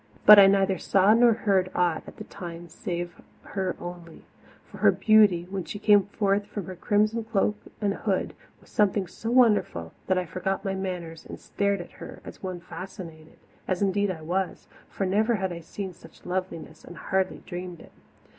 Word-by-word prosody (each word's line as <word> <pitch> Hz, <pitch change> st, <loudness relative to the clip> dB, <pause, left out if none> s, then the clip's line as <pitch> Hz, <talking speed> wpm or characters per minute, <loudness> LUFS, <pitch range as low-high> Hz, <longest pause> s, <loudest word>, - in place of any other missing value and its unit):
But 210 Hz, 0 st, +11 dB
I 195 Hz, -, +9 dB
neither 195 Hz, -2 st, +2 dB
saw 195 Hz, +2 st, +4 dB
nor 235 Hz, +1 st, +6 dB
heard 195 Hz, -4 st, +1 dB
aught 175 Hz, -3 st, +1 dB
at -, -, -11 dB
the -, -, -7 dB
time 175 Hz, -2 st, -9 dB
save 175 Hz, +1 st, -5 dB, 0.2 s
her 190 Hz, -2 st, -3 dB
only, 175 Hz, -2 st, -9 dB, 0.4 s
for -, -, -13 dB
her -, -, +6 dB
beauty, 210 Hz, -6 st, +4 dB
when 195 Hz, -2 st, -3 dB
she 205 Hz, -, -7 dB
came 205 Hz, -2 st, +4 dB
forth 200 Hz, 0 st, 0 dB
from 205 Hz, -4 st, -6 dB
her 185 Hz, -, -7 dB
crimson 210 Hz, +4 st, +1 dB
cloak 210 Hz, -1 st, 0 dB, 0.2 s
and 205 Hz, -2 st, 0 dB
hood, 200 Hz, -2 st, -2 dB, 0.3 s
was -, -, -22 dB
something 205 Hz, -1 st, +2 dB
so 220 Hz, +5 st, -6 dB
wonderful 220 Hz, -, +2 dB
that 185 Hz, -, +2 dB
I 180 Hz, -, 0 dB
forgot 190 Hz, +4 st, -3 dB
my 195 Hz, -, -1 dB
manners 180 Hz, -4 st, -5 dB
and -, -, -9 dB
stared 200 Hz, -2 st, -1 dB
at 175 Hz, -, -11 dB
her -, -, -9 dB
as -, -, -10 dB
one 185 Hz, -2 st, -5 dB
fascinated 170 Hz, -4 st, -10 dB, 0.3 s
as 185 Hz, +1 st, 0 dB
indeed 200 Hz, +1 st, +1 dB
I 165 Hz, -4 st, -5 dB
was, 185 Hz, +3 st, -2 dB, 0.2 s
for 195 Hz, -, -3 dB
never 215 Hz, +5 st, +2 dB
had 190 Hz, -3 st, -2 dB
I 170 Hz, -, -6 dB
seen 185 Hz, +3 st, -7 dB
such 170 Hz, -, -17 dB
loveliness 180 Hz, -4 st, -5 dB
and 175 Hz, -, -11 dB
hardly 190 Hz, +6 st, -1 dB
dreamed 180 Hz, -2 st, -7 dB
it. -, -, -15 dB
190 Hz, 185 wpm, -26 LUFS, 175-205 Hz, 0.4 s, But